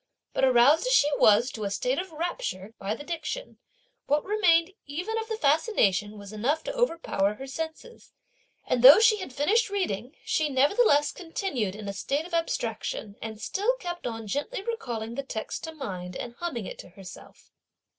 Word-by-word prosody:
But - - -1
aroused 265 - +5
as - - +2
she 295 -11 +5
was 220 +5 +5
to 220 - -6
a 200 - -1
state 250 +7 -1
of 375 -1 -5
rapture 315 - -4
by 200 +3 -2
the 290 - -9
diction, 340 +10 -5 0.5
what 295 +1 +1
remained 380 -4 +3
even 355 +10 -3
of 445 - -5
the 445 - -2
fascination 255 - +2
was 200 0 -10
enough 275 +9 0
to - - -4
overpower 330 - 0
her 265 - -8
senses; 320 - -7 0.5
and 250 - 0
though 265 +4 +11
she 445 -1 +5
had 375 -9 -7
finished 410 - +2
reading, 275 - -3
she 310 -1 +1
nevertheless 290 - +3
continued 325 - -3
in 210 -1 -8
a 200 - -3
state 280 +10 -2
of 350 - -12
abstraction, 225 -9 -2
and 220 -1 -6
still 415 - 0
kept 350 - -5
on 225 -1 -5
gently 290 - -3
recalling 240 - -4
the 275 - -3
text 225 -5 -5
to 320 - -6
mind, 185 - -6
and 240 - -6
humming 270 - -3
it - - -8
to - - -10
herself. 190 0 -13
285 Hz, 180 wpm, -27 LUFS, 220-360 Hz, 0.5 s, though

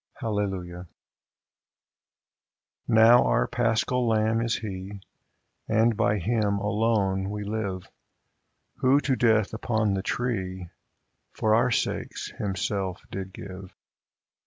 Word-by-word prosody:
Hallelujah! 95 -6 -3 2.0
Now 115 +2 +6
our - - +2
Paschal 120 +1 0
Lamb 110 0 +2
is 115 -1 0
He, 100 -2 -6 0.7
And 110 +1 +3
by 105 -1 +2
Him 105 +1 0
alone 100 -2 0
we 105 0 -4
live, 100 -3 -4 0.9
Who, 130 +2 +4
to 135 -1 +1
death 110 -4 +2
upon 110 -2 0
the 95 - -1
tree, 95 -7 -3 0.6
For 110 -1 +1
our 115 +3 +4
sakes 115 - -2
Himself 95 -1 -3
did 95 -1 -5
give. 95 0 -10
105 Hz, 105 wpm, -26 LUFS, 95-115 Hz, 2.0 s, Now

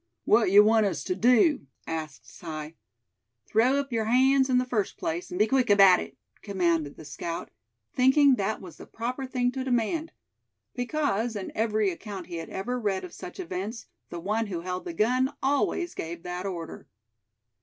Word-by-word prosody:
"Wat 230 - +4
yuh 205 +2 +8
want 220 0 +4
us 195 - -3
tuh - - -1
do?" 245 - +3 0.2
asked 155 -4 -6
Si. 155 -2 -7 0.7
"Throw 240 +5 +3
up 280 -1 -2
your 225 -1 0
hands, 265 +3 +4
in 255 - +3
the 250 - +2
first 225 -5 -2
place, 170 +2 -3
and 180 - -5
be 210 - +4
quick 255 +1 +1
about 195 -3 +7
it!" - - -8 0.2
commanded 170 -7 0
the 155 - -11
scout, 165 +3 -5 0.4
thinking 265 +2 +5
that 215 -2 -1
was 175 -5 -11
the - - -12
proper 250 +4 -4
thing 250 -1 0
to 260 0 -4
demand; 265 +6 -1 0.6
because, 245 -4 -1
in 200 -2 -5
every 215 -2 +1
account 190 +1 -7
he 175 -2 -6
had 165 - -6
ever 245 +6 -3
read 195 -4 -1
of 180 - -9
such 180 - -9
events, 195 +6 -5 0.2
the 170 - -6
one 215 +5 -1
who 175 -4 -4
held 180 +1 -4
the 345 - -5
gun 255 +2 +1
always 285 +5 0
gave 165 +1 -6
that 180 +1 -4
order. 170 -4 -7
215 Hz, 180 wpm, -27 LUFS, 180-250 Hz, 0.7 s, yuh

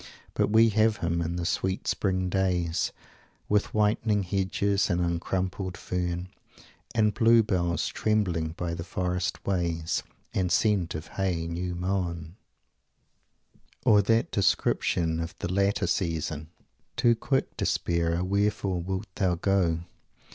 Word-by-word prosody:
But - - +1
we 110 +1 +5
shall 105 - -1
have 110 -1 +3
him 85 0 -1
in 85 +1 -2
the 85 -1 -2
sweet 95 +2 -1
spring 95 -2 0
days, 90 -3 0 0.6
With 105 0 +1
whitening 105 -1 +2
hedges 100 +2 0
and 90 - +1
uncrumpling 90 +2 -2
fern, 90 0 -3 0.7
And 105 -2 +3
blue 115 0 +5
bells 85 -4 0
trembling 90 -7 0
by 85 -1 -2
the 85 0 -4
forest 90 +1 -2
ways, 85 -4 0 0.3
And 90 -2 0
scent 90 -2 +2
of 80 0 -5
hay 90 -4 -1
new 85 +1 -3
mown 85 -2 -2 0.7
" - - -36
Or 105 -1 +6
that 115 +3 +1
description 85 -4 +1
of 85 0 -4
the 90 - -3
later 100 +1 +2
season: 80 -4 -2 0.5
"Too 120 - +4
quick 135 +4 -1
despairer! 85 0 0
Wherefore 100 -1 0
wilt 95 +3 -3
thou 95 -4 +1
go? 85 -2 +1
90 Hz, 135 wpm, -27 LUFS, 85-100 Hz, 0.7 s, Or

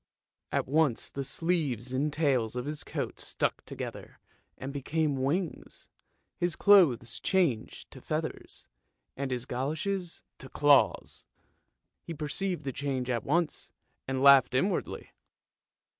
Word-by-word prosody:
" - - -63
At - - 0
once 145 -3 +1
the 140 - -4
sleeves 135 -7 -1
and 145 +4 0
tails 130 -7 +1
of 125 +1 -3
his 150 0 -3
coat - - -4
stuck - - -2
together - - -8 0.4
and 135 +1 -6
became 145 0 -1
wings, 160 +6 -3 0.5
his 175 -2 0
clothes 135 - +4
changed 165 - 0
to - - -12
feathers, - - -5 0.5
and 140 0 -3
his 125 -1 -3
goloshes 160 +8 -3 0.2
to 130 - -9
claws. 145 0 +3 0.8
He 165 - -7
perceived 175 +5 -2
the 135 -1 -4
change 130 -3 -2
at 120 -3 -1
once, 170 +3 -1 0.4
and 130 0 -1
laughed 140 -2 +7
inwardly. 185 +8 -1
140 Hz, 130 wpm, -29 LUFS, 130-165 Hz, 0.8 s, laughed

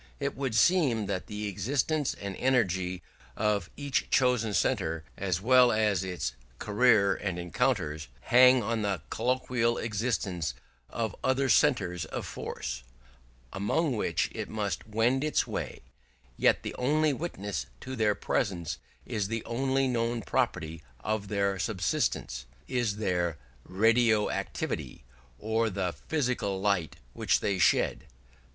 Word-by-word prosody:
It 140 -1 -2
would 130 -4 -2
seem 130 - +3
that 95 -2 -3
the 105 0 -4
existence 135 - 0
and 100 -1 -6
energy 95 -8 +1 0.3
of 105 -4 0
each 140 -2 -1
chosen 125 -4 +3
centre, 80 0 0
as 95 -2 -1
well 125 +2 +6
as 105 -4 +2
its 90 -9 -3 0.2
career 105 - +4
and 95 -4 -3
encounters, 90 - -1
hang 125 0 +6
on 115 +1 -1
the 100 -6 -1
collateral 120 -1 +1
existence 105 -6 -2 0.3
of 110 -3 -3
other 130 +1 +2
centres 100 - +3
of - - -5
force, - - -5 0.7
among 120 +9 0
which 105 - 0
it - - -5
must 105 -3 -3
wend 115 +5 +2
its 155 - +1
way: - - -5 0.5
yet - - +3
the - - -4
only 150 +3 +2
witness 100 - -4
to 130 - -6
their 105 -3 +2
presence, 90 -9 -1 0.3
and 115 -4 -3
the 115 +2 -3
only 135 +2 +1
known 115 -2 -1
property 80 -3 -1 0.2
of 110 -2 -2
their 100 -1 0
substance, 85 - -1 0.2
is 120 -5 0
their 90 -6 0 0.3
"radio 110 +2 +3
activity", - - -4 0.3
or 110 +1 0
the 95 -3 -2
physical 125 -10 0
light 100 -5 0 0.2
which - - +2
they 100 -2 -1
shed. 80 -1 +2
110 Hz, 130 wpm, -29 LUFS, 95-125 Hz, 0.7 s, well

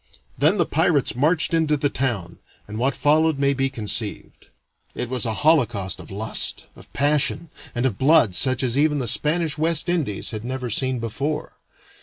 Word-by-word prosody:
Then 160 +8 +2
the 170 - +2
pirates 150 -7 +1
marched 155 +6 +2
into 160 -2 +2
the 145 - +1
town, 115 -11 -3 0.3
and 105 +2 -6
what 135 +3 0
followed 155 +1 +2
may 140 0 +2
be 135 0 0
conceived. 110 -3 -3 0.5
It 125 - -4
was 125 -1 -1
a 110 - -1
holocaust 115 - +2
of - - -12
lust, 110 +3 -4
of - - -16
passion, 145 +3 +1 0.2
and 120 +2 -1
of 115 -7 -1
blood 140 - +4
such 130 +8 +4
as 130 +1 0
even 150 0 +2
the 130 -4 -2
Spanish 155 +5 0
West 165 +1 0
Indies 155 - -2
had 110 -1 -6
never 125 -1 -4
seen 130 +3 0
before. 140 +7 -4
135 Hz, 175 wpm, -22 LUFS, 115-155 Hz, 0.5 s, blood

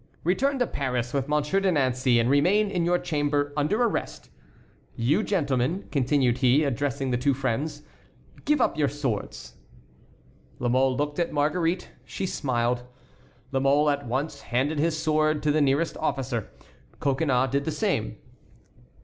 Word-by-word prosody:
"Return 270 - +1
to 245 - +2
Paris 125 - -3
with 135 -1 -1
Monsieur 150 +5 +1
de 195 -1 +1
Nancey, 130 -4 +2
and 115 - +2
remain 185 +10 +3
in 175 -3 0
your 175 +1 +3
chamber 145 -4 -1
under 155 +11 +1
arrest. - - -3 0.6
You, 140 - +2
gentlemen," 155 - -1
continued 130 -3 +1
he, 130 +3 +4
addressing 135 0 -1
the 120 - 0
two 135 +1 +2
friends, 140 +4 -2 0.6
"give 300 0 +2
up 245 - +1
your 145 - +3
swords." 125 - -4 1.0
La 120 - -1
Mole 130 +1 +2
looked 145 +1 -2
at 170 - 0
Marguerite. 165 +4 0
She - - -5
smiled. 125 -7 -1 0.7
La 135 - +1
Mole 145 +2 +3
at 145 -2 -3
once 140 +4 -3
handed 135 +5 -1
his 160 +1 +1
sword 155 -1 +1
to 150 - +2
the 155 +1 +2
nearest 145 +4 +1
officer. 130 -7 -2 0.5
Coconnas 135 -2 +1
did 140 +1 0
the - - -1
same. 150 - -1
145 Hz, 150 wpm, -26 LUFS, 130-155 Hz, 1.0 s, he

